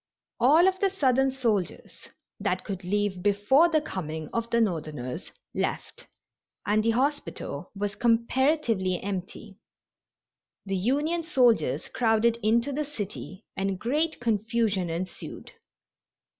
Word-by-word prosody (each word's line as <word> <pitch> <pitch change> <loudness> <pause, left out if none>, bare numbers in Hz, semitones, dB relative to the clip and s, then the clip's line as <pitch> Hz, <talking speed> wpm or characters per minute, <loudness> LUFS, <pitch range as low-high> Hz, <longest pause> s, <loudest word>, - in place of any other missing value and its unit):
All 310 +9 +6
of 375 0 +1
the 395 - +3
Southern 270 -8 +2
soldiers 230 -8 -2 0.3
that 190 -3 -1
could 195 -2 -5
leave 200 0 -1
before 205 - +4
the 315 -2 +3
coming 160 - -5
of 230 0 -2
the 235 - +2
Northerners 155 - -2 0.2
left, - - -3 0.6
and 215 +2 +2
the 230 - +2
hospital 275 +6 -2
was 205 0 -2
comparatively 235 - +2
empty. 195 +1 -6 1.1
The 195 -1 -2
Union 290 - +1
soldiers 245 - +2
crowded 230 0 +2
into 230 +5 +2
the 295 +2 -1
city 210 -7 -7
and 195 0 -1
great 300 - 0
confusion 220 -4 0
ensued. 175 +3 -6
225 Hz, 115 wpm, -27 LUFS, 195-265 Hz, 1.1 s, All